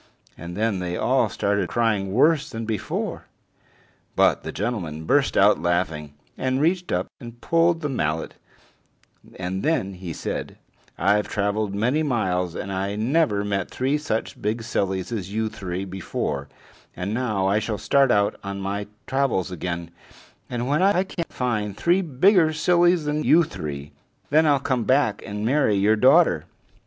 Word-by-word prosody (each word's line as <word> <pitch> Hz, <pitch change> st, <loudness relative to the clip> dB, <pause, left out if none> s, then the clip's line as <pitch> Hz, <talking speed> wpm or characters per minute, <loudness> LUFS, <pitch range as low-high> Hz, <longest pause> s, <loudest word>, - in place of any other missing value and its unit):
And 85 Hz, +2 st, -8 dB
then 110 Hz, -3 st, 0 dB
they 90 Hz, -1 st, -3 dB
all -, -, +2 dB
started 100 Hz, -2 st, -1 dB
crying 110 Hz, -5 st, 0 dB
worse 150 Hz, +7 st, +3 dB
than 115 Hz, 0 st, -5 dB
before. 110 Hz, -3 st, -3 dB, 0.9 s
But -, -, +3 dB
the -, -, -6 dB
gentleman 85 Hz, -10 st, -3 dB
burst 140 Hz, -, +2 dB
out 100 Hz, +2 st, +5 dB
laughing, 80 Hz, -4 st, -1 dB, 0.2 s
and 130 Hz, 0 st, 0 dB
reached 175 Hz, +4 st, +1 dB
up 90 Hz, +1 st, 0 dB
and 120 Hz, -1 st, -10 dB
pulled 165 Hz, +4 st, +3 dB
out 165 Hz, -, -13 dB
the 150 Hz, -, -1 dB
mallet, 80 Hz, -, -2 dB, 1.0 s
and 95 Hz, +1 st, -3 dB
then 140 Hz, -11 st, 0 dB
he 90 Hz, -2 st, -7 dB
said: -, -, -5 dB, 0.4 s
"I've 105 Hz, 0 st, +2 dB
traveled 100 Hz, 0 st, -1 dB
many 125 Hz, +9 st, +1 dB
miles, 90 Hz, -, 0 dB
and 100 Hz, -, -5 dB
I 100 Hz, +2 st, -2 dB
never 110 Hz, -2 st, +1 dB
met 100 Hz, -2 st, -2 dB
three 135 Hz, +3 st, 0 dB
such 110 Hz, -, -3 dB
big 110 Hz, +3 st, -1 dB
sillies 95 Hz, -4 st, -2 dB
as 100 Hz, -5 st, -4 dB
you 110 Hz, +1 st, -1 dB
three 95 Hz, -2 st, -5 dB
before; 75 Hz, -7 st, -4 dB, 0.5 s
and 95 Hz, +4 st, -3 dB
now 110 Hz, -5 st, 0 dB
I 100 Hz, +2 st, +3 dB
shall 110 Hz, 0 st, -3 dB
start 135 Hz, +6 st, +3 dB
out 100 Hz, -3 st, +2 dB
on 100 Hz, 0 st, -5 dB
my 100 Hz, +1 st, -3 dB, 0.2 s
travels 130 Hz, -9 st, 0 dB
again, 85 Hz, -1 st, -4 dB, 0.6 s
and 120 Hz, 0 st, -3 dB
when 150 Hz, +5 st, +1 dB
I 190 Hz, -1 st, +4 dB
can 180 Hz, -3 st, -5 dB
find 110 Hz, -5 st, -2 dB
three 175 Hz, +3 st, +3 dB
bigger 165 Hz, +2 st, +3 dB
sillies 175 Hz, +1 st, +3 dB
than 150 Hz, +1 st, -1 dB
you 170 Hz, +2 st, +5 dB
three, 75 Hz, -, -6 dB, 0.4 s
then 155 Hz, +2 st, +5 dB
I'll 145 Hz, -2 st, +4 dB
come 130 Hz, -3 st, -1 dB
back 130 Hz, -4 st, +2 dB
and 105 Hz, +1 st, -4 dB
marry 130 Hz, -4 st, +2 dB
your 100 Hz, +2 st, +3 dB
daughter." 105 Hz, -, +4 dB
105 Hz, 160 wpm, -24 LUFS, 95-140 Hz, 1.0 s, out